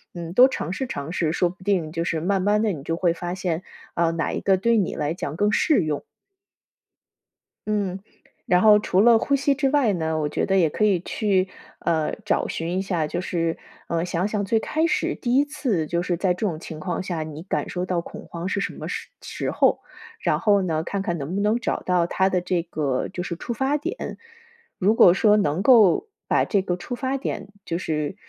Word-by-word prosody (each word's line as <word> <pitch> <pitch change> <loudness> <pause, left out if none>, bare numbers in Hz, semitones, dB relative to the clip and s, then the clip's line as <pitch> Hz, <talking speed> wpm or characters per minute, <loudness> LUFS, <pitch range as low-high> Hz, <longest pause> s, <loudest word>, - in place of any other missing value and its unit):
嗯， 170 -1 -6
多 250 +6 +8
尝 185 - -4
试 260 +6 -3
尝 140 -2 -5
试， 160 -3 0
说 175 +1 +1
不 185 +1 -13
定 185 -6 0
就 165 0 -2
是 165 -2 -1
慢 190 +2 +1
慢 210 +2 +2
地 210 -4 +1
你 145 - -7
就 165 +3 -2
会 170 0 +1
发 175 +1 -4
现 180 -2 -2 0.3
呃， 170 -1 +1
哪 165 -1 -1
一 - - -2
个 195 -1 +3
对 230 +4 +2
你 195 -5 0
来 150 0 -1
讲 155 -3 -5
更 205 +3 +2
适 290 - +3
用。 150 -2 -2 1.6
嗯， 200 -3 -1 0.5
然 180 0 +3
后 210 -1 +7
除 195 -2 +2
了 235 +1 +7
呼 280 +4 +1
吸 275 0 +1
之 275 -1 +1
外 280 -7 +3
呢， 160 -2 -1
我 150 -1 -1
觉 - - -1
得 195 - +1
也 170 -4 +4
可 210 +8 +1
以 195 -4 +3
去 190 0 0 0.3
呃， 160 -2 0
找 210 - 0
寻 170 +2 -3
一 190 - +1
下， 175 -5 -1
就 175 - -3
是 165 -2 -1 0.3
嗯， 170 +1 -1
想 180 +2 -1
想 210 -1 -2
最 220 +3 +2
开 315 +8 0
始 340 - 0
第 245 0 -1
一 280 - +5
次 225 - -1
就 170 +1 -1
是 175 - 0
在 180 +1 +1
这 215 - -2
种 160 -5 -3
情 160 -2 -8
况 175 +1 -3
下， 175 -4 -3
你 155 0 -8
感 185 - -2
受 180 - -3
到 180 -2 -1
恐 - - -10
慌 170 +1 -5
是 200 - -1
什 - - -2
么 - - -7
时 - - -5
时 - - -4
候， - - +2 0.4
然 - - +1
后 205 -2 +3
呢， 160 -3 -1
看 200 +3 -3
看 175 -3 -2
能 150 +6 -4
不 200 - 0
能 210 +3 +2
找 - - -2
到 180 -2 +1
它 190 +2 +1
的 185 - +1
这 180 -1 -1
个 145 -6 -2
就 180 -1 -5
是 170 - -4
触 235 - -6
发 270 +5 0
点。 335 +6 -5 0.6
如 205 +3 +3
果 180 -5 +7
说 210 0 +4
能 175 -1 0
够 235 - +5 0.2
把 - - +2
这 200 - +1
个 180 -2 -2
触 245 - -7
发 265 +2 -2
点 260 - -4 0.2
就 170 - -2
是 150 -4 -2
185 Hz, 245 characters per minute, -24 LUFS, 165-210 Hz, 1.6 s, 多